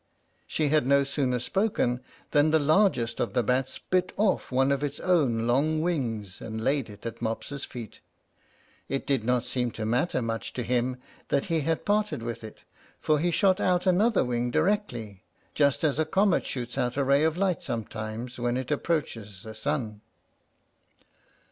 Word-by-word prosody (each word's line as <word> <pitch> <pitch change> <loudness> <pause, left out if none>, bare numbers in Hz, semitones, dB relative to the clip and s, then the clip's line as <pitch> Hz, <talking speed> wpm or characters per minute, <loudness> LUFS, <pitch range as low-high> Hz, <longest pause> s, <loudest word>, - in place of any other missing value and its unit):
She 155 -2 0
had 150 -3 +3
no 140 0 +5
sooner 135 -2 0
spoken 125 - 0 0.3
than 150 0 +4
the 160 - +4
largest 145 - +2
of - - -1
the 125 -2 +2
bats 130 +3 0
bit 185 0 0
off 205 -8 +1
one 135 +2 +3
of 140 0 +1
his 145 -1 -3
own 135 -11 +2
long 145 +6 +2
wings, 115 - -2
and 110 0 -5
laid 135 -3 +1
it 105 +1 -13
at 115 - -6
Mopsa's 120 +5 -3
feet. 120 -4 -9 0.9
It 135 - -2
did 135 -6 +1
not 125 0 +1
seem 125 -1 -1
to 110 - -4
matter 125 +6 +1
much 115 -1 -3
to 125 - -3
him 125 +1 0 0.3
that 140 - +1
he 165 - +3
had 160 +2 -1
parted 210 - +1
with 115 -1 -5
it, 110 - -11 0.4
for 155 -1 +2
he 175 +4 +1
shot 185 +2 +3
out 180 0 +2
another 195 - +3
wing 120 0 -1
directly, 120 - -1 0.3
just 140 -1 +2
as 150 -1 +2
a 160 - +3
comet 195 +3 +2
shoots 125 -2 -4
out 125 +1 -1
a 140 - +2
ray 140 +2 +4
of 160 +1 +1
light 190 -2 +1
sometimes, 115 +2 -5
when 120 +1 0
it 130 +2 -4
approaches 115 - -2
the 110 - -8
sun. 110 -3 -3
135 Hz, 175 wpm, -27 LUFS, 120-155 Hz, 0.9 s, no